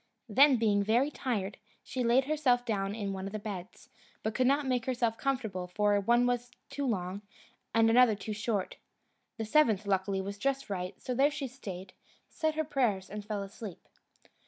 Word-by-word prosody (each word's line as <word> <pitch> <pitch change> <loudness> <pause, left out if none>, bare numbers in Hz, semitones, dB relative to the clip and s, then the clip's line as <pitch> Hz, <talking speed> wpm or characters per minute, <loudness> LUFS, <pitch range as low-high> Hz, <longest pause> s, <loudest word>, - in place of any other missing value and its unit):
Then, 265 +4 +6
being 210 -3 +2
very 235 +8 +2
tired, 215 -8 -3 0.2
she 255 - -3
laid 240 +3 +4
herself 265 -5 +2
down 200 -3 -1
in 200 -3 -3
one 190 0 -4
of 195 - -8
the - - -1
beds, 200 -4 -7 0.4
but 220 - -1
could 255 +2 +2
not 280 +2 +3
make 250 -2 0
herself 240 -3 +1
comfortable, 220 -9 -2
for 205 +2 +2
one 240 +4 +3
was 245 0 0 0.2
too 280 -1 -2
long, 190 -3 -2 0.5
and 225 0 +5
another 235 -1 +6
too 210 +1 -5
short. 210 -2 -2 0.6
The 225 - -3
seventh, 220 -5 +3
luckily, 195 0 0
was 200 +1 -5
just 275 -2 -1
right; 180 -1 -4
so 250 - -3
there 275 +4 +4
she 290 -2 -4
stayed, 190 -7 -8 0.4
said 315 -1 -1
her 315 - +1
prayers, 235 -11 0
and 210 0 -5
fell 205 -1 -3
asleep. 195 -1 -9
220 Hz, 180 wpm, -31 LUFS, 200-255 Hz, 0.6 s, Then